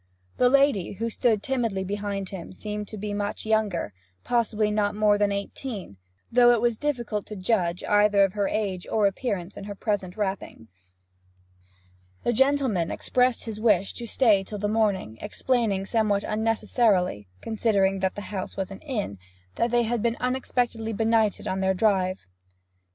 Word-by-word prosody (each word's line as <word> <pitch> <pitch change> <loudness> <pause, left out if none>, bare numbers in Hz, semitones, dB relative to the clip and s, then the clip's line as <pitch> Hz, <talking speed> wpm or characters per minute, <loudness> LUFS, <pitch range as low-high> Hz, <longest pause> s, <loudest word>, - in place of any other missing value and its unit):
The 250 - +5
lady, 275 -10 +3
who 230 +3 -3
stood 220 -2 +1
timidly 230 -8 -1
behind 200 -1 -3
him, 185 -4 -7
seemed 210 +1 -5
to 215 - -8
be 210 0 -4
much 205 +1 -3
younger 215 - 0 0.3
possibly 220 -3 +1
not 205 -1 0
more 210 -1 +4
than 205 -1 +2
eighteen, 200 - -5 0.3
though 240 0 +6
it 235 - +2
was 235 0 +1
difficult 240 -6 -2
to 215 - -7
judge 185 -3 0
either 205 -1 +4
of 195 -1 +1
her 205 -2 0
age 195 -4 -2
or 215 -2 +2
appearance 195 -3 -2
in - - -7
her 205 0 -6
present 195 -3 -2
wrappings. 185 - -5 1.4
The 240 - +1
gentleman 265 -9 +2
expressed 250 -1 +1
his 220 -2 -6
wish 200 -4 +3
to 235 - -7
stay 215 -5 +3
till 210 +2 -7
the 205 +1 -1
morning, 205 - 0
explaining 210 -3 0
somewhat 205 -2 +1
unnecessarily, 215 - +1
considering 200 -3 +1
that 190 0 0
the 205 - -5
house 190 -2 -4
was 195 0 -3
an 195 - -8
inn, 210 - -4 0.3
that 235 - 0
they 240 0 +3
had 235 0 -1
been 235 +1 0
unexpectedly 245 -3 -1
benighted 220 -1 +1
on 190 - -1
their 190 0 +1
drive. 190 -2 +1
210 Hz, 160 wpm, -26 LUFS, 195-230 Hz, 1.4 s, though